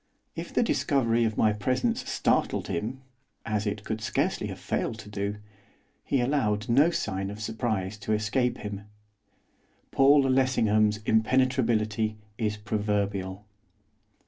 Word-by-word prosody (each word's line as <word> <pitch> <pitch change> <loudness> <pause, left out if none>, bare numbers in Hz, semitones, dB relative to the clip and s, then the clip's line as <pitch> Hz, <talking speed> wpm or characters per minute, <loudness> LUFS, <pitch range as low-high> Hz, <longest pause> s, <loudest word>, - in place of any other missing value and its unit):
If - - -6
the - - +2
discovery 120 -4 +2
of 110 -1 -2
my 110 -1 +4
presence 130 - -1
startled - - +1
him, 115 +10 -3 0.4
as 105 -1 -1
it 105 0 -3
could 110 0 -4
scarcely 110 - -1
have - - -6
failed - - -2
to 105 - -10
do, 100 0 -3 0.7
he 135 - +1
allowed 115 -6 0
no 140 +7 +5
sign 95 - -2
of 105 +1 -7
surprise 110 -3 -2
to 105 +2 -1
escape 120 +4 0
him. 100 -1 -6 1.1
Paul 140 +1 +5
Lessingham's 110 -5 +2
impenetrability 110 -2 +2 0.2
is 105 -2 -1
proverbial. 105 -2 -2
110 Hz, 125 wpm, -27 LUFS, 105-125 Hz, 1.1 s, no